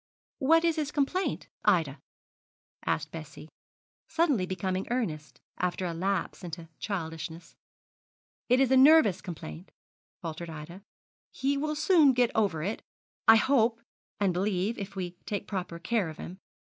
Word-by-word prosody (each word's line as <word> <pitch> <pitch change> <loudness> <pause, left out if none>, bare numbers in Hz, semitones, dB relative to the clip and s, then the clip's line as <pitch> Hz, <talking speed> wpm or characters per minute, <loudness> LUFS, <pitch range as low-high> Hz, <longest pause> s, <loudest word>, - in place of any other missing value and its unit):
What 325 +5 +4
is 335 -1 +2
his 300 -2 -1
complaint, 310 +7 -1 0.2
Ida?' 165 -9 +2 0.9
asked - - -1
Bessie, 155 -1 -9 0.6
suddenly 285 - +1
becoming 185 +1 -2
earnest, 155 - -3 0.2
after 180 +1 -1
a 170 - -2
lapse 185 +2 -2
into 170 -1 -7
childishness. 165 -3 -5 0.9
'It 250 +1 +5
is 265 -1 +3
a 265 - +6
nervous 260 - +6
complaint,' 90 - -8 0.5
faltered 165 +1 -6
Ida; 160 +4 -9 0.5
'he 275 +1 -1
will 305 +2 -1
soon 310 -3 +5
get 245 -1 +2
over 190 -8 +1
it, 205 +5 -3 0.5
I 225 - +10
hope 230 -1 +3 0.4
and 195 -3 +2
believe, 195 +4 0
if 195 0 -6
we 180 -2 -5
take 205 - -3
proper 180 -4 -4
care 200 0 0
of 155 - -9
him. 185 +3 -8
195 Hz, 140 wpm, -29 LUFS, 170-255 Hz, 0.9 s, I